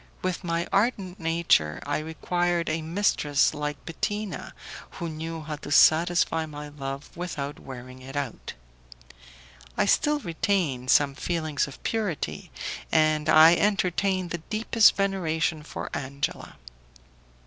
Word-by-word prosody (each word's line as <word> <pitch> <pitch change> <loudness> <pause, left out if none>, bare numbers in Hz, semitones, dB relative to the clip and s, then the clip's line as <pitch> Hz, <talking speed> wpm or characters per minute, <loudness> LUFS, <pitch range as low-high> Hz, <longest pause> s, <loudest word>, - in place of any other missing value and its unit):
With 185 +1 -2
my 170 0 -1
ardent 200 -3 +1
nature, 165 - +2
I 145 +1 -1
required 170 +2 -1
a 160 +1 -1
mistress 160 -4 +1
like 150 -1 -4
Bettina, 205 +5 -4 0.4
who 170 - -3
knew 160 +1 -5
how 150 0 -5
to 145 - -9
satisfy 165 +1 +4
my 150 -1 -8
love 140 -1 -7
without 150 -5 -5
wearing 130 0 -10
it 135 +2 -10
out. 140 -5 -4 1.2
I - - +3
still 300 0 +3
retained 165 - -1
some 140 +1 +4
feelings 155 -1 -1
of 140 - -12
purity, 210 -8 -2 0.4
and 155 -1 +3
I 160 +2 +8
entertained 190 -2 +1
the 170 - -2
deepest 220 +5 +3
veneration 165 -5 0
for 150 - -7
Angela. 140 +1 -4
160 Hz, 125 wpm, -26 LUFS, 145-180 Hz, 1.2 s, I